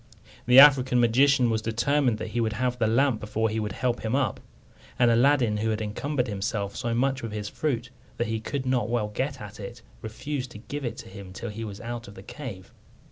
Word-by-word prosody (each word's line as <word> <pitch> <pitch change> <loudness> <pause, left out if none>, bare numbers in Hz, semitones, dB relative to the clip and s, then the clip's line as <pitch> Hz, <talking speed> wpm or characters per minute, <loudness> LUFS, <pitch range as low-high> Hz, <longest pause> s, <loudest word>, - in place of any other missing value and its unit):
The 125 +1 +6
African 130 -3 +8
magician 125 +1 +4
was 110 -1 0
determined 120 +2 +1
that - - -5
he 120 - -1
would 110 -1 0
have 125 +2 -1
the 110 - +2
lamp 120 +1 +2
before 110 +1 -1
he 110 +1 -2
would 105 -1 -3
help 125 0 -1
him 110 +3 0
up; 135 -7 0 0.6
and 120 -1 +4
Aladdin, 120 -2 +3
who 110 +2 -1
had 110 -1 -1
encumbered 125 +5 -2
himself 100 -1 -3
so 120 -2 -2
much 135 +2 +1
with 115 -2 -5
his 105 -1 -4
fruit 125 -5 -2 0.3
that 120 - 0
he 110 -1 -2
could 130 +4 -4
not 125 -4 0
well 115 -3 0
get 130 +6 -3
at 105 -2 -10
it, 115 +3 -8 0.2
refused 130 +4 -5
to - - -9
give 140 +6 -6
it 120 -1 -4
to - - -9
him 95 -1 -10
till 95 - -6
he 110 +2 -6
was 105 -2 -7
out 120 0 -6
of 100 - -12
the 95 - -11
cave. 105 -7 -9
115 Hz, 225 wpm, -26 LUFS, 110-130 Hz, 0.6 s, African